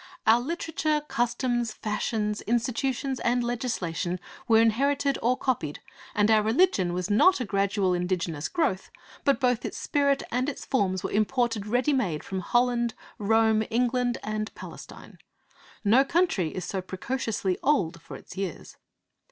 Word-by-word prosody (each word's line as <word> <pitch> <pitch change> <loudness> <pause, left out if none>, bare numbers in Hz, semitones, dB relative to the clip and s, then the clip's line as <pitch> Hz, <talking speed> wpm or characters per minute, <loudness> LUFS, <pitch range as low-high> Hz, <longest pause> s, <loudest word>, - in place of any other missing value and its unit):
'Our 225 +2 +6
literature, 310 0 -1
customs, 240 -2 0
fashions, 210 0 -2
institutions, 255 +3 -1
and 245 +1 +1
legislation 185 -8 -2 0.3
were 225 -2 +5
inherited 275 +5 +2
or 250 +2 +2
copied, 185 - -2 0.4
and 210 +1 +3
our 215 -1 +5
religion 220 - +2
was 180 +3 -2
not 365 - +5
a 250 - -2
gradual 195 -1 +1
indigenous 175 -4 -2
growth, 255 - -1 0.3
but 280 -1 +3
both 250 -3 +1
its - - -5
spirit 280 -1 +1
and 255 +4 0
its 280 - -7
forms 190 -7 0
were - - -3
imported 220 0 0
ready 250 +6 +2
made 185 - -1
from 190 - -4
Holland, 240 +3 +1 0.2
Rome, 220 +1 +3
England, 245 +1 +1
and 215 0 -3
Palestine. - - -11 0.6
No 230 +6 +5
country 275 - +1
is 180 +2 -5
so 190 +1 -3
precociously 195 0 -2
old 175 - +1
for - - -10
its - - -13
years.' 190 -4 -5
225 Hz, 145 wpm, -27 LUFS, 195-255 Hz, 0.6 s, Our